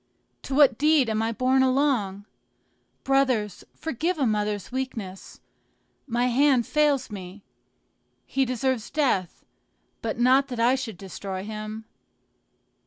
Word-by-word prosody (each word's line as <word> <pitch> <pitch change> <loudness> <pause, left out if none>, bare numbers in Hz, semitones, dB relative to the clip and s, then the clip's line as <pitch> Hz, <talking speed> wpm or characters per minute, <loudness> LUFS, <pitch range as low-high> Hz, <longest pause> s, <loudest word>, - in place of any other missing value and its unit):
to 270 - -4
what 275 -5 +5
deed 295 -5 +3
am 220 0 0
I 225 +1 0
borne 255 +3 +2
along? 255 -7 +1 0.8
Brothers 260 -7 +1
forgive 320 +4 -2
a 280 - +1
mother's 210 -3 -1
weakness! 230 -8 -6 0.7
my 240 0 0
hand 255 0 +3
fails 295 -5 +1
me. 195 0 -9 0.8
He 270 - 0
deserves 255 -2 -1
death, 245 - -1 0.6
but 225 -1 -3
not 260 +3 +4
that 245 -3 -6
I 240 +2 +4
should 245 -7 -4
destroy 190 0 -6
him. 215 +1 -6
245 Hz, 120 wpm, -25 LUFS, 210-270 Hz, 0.8 s, what